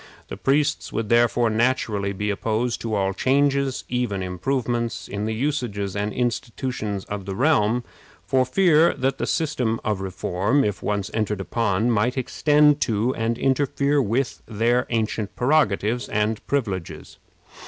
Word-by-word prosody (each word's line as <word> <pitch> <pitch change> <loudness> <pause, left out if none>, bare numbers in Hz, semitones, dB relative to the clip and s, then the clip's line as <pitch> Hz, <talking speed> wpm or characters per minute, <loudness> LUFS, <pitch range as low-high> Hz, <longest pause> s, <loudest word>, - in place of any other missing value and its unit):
The - - -5
priests 145 +2 +1
would 110 -1 -3
therefore 120 0 +3
naturally 110 -4 0
be 105 +1 -2
opposed 115 +4 -1
to 110 -2 -2
all 95 -1 0
changes 140 +3 +1
even 120 -6 -1
improvements 115 +4 -2
in 100 +1 -4
the 110 - -1
usages 115 -7 -2
and 105 +1 -1
institutions 115 -4 -3
of 100 -2 -6
the 95 - -3
realm, 120 -3 +2 0.4
for 130 -1 +2
fear 165 +3 +4
that 135 0 -1
the - - -1
system 135 -8 0
of 105 -3 -1
reform, 95 +7 0
if 105 -2 -2
once 100 -2 -2
entered 105 -2 -1
upon, 110 +2 0
might 120 +4 +1
extend 150 +3 +3
to 115 +3 +1
and 115 -1 -1
interfere 140 +2 +1
with 125 +2 -1
their 115 +3 +1
ancient 110 -2 -2
prerogatives 120 -4 +1
and 105 0 -1
privileges. 100 - -3
115 Hz, 145 wpm, -23 LUFS, 105-130 Hz, 0.4 s, fear